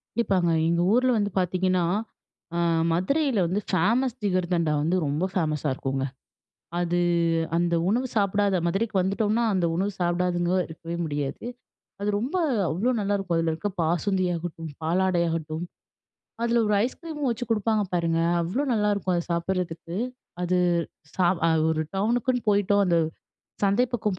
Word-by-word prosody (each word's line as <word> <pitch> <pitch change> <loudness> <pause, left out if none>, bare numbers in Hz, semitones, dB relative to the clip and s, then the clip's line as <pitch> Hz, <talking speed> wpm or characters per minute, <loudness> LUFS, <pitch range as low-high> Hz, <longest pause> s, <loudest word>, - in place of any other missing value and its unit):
கண்டிப்பாங்க. 190 -7 +2 0.2
எங்க 170 0 +2
ஊர்ல 255 +2 +4
வந்து 205 -1 0
பார்த்தீங்கன்னா, 185 0 +1 0.7
அ - - 0 0.3
மதுரையில 260 - +1
வந்து 190 +5 -1
ஃபேமஸ் 230 +8 +2
ஜிகர்தண்டா 175 -5 +1
வந்து 165 +5 +1
ரொம்ப 150 +5 0
ஃபேமஸா 155 -4 0
இருக்குங்க. 135 0 -2 0.7
அது 175 0 +1 0.6
அந்த 170 0 +1
உணவு 240 +6 +1
சாப்பிடாத 200 -2 +2
மதுரைக்கு 200 +5 -1
வந்துட்டோம்னா, 210 +4 +1
அந்த 180 -2 +2
உணவு 200 +3 0
சாப்பிடாதங்க 175 0 +1 0.2
இருக்கவே 165 +1 -6
முடியாது. 145 +2 -3 0.6
அது 205 - 0
ரொம்ப 260 - -3 0.3
அவ்ளோ 205 +10 +1
நல்லாயிருக்கும். 195 -4 0
அதுல 165 -1 +1
இருக்க 165 +6 -3
பாசுந்தியாகட்டும், 175 -1 -1
பாலாடையாகட்டும், 165 -2 0 0.8
அதுல 235 0 +2
ஒரு 210 - +3
ஐஸ் 250 - -4
கிரீமும் 305 -5 -3
வச்சு 235 +1 -3
குடுப்பாங்க 215 -1 +1
பாருங்க. 165 -1 +1 0.2
அவ்ளோ 190 +13 -1
நல்லாயிருக்கும், 205 -4 +1
அத 170 - -1
சாப்பிடுறதுக்கு. 170 -1 -2 0.5
அது 180 +1 +1 0.6
ச - - -19 0.3
அ - - +3 0.2
ஒரு 155 0 0
டவுனுக்குன்னு 240 +4 +1
போயிட்டோம், 205 0 +3
அந்த 170 -2 +3 0.7
சந்தை 200 +5 +3
பக்கம் 210 -5 -1
185 Hz, 130 wpm, -26 LUFS, 170-210 Hz, 0.8 s, ஊர்ல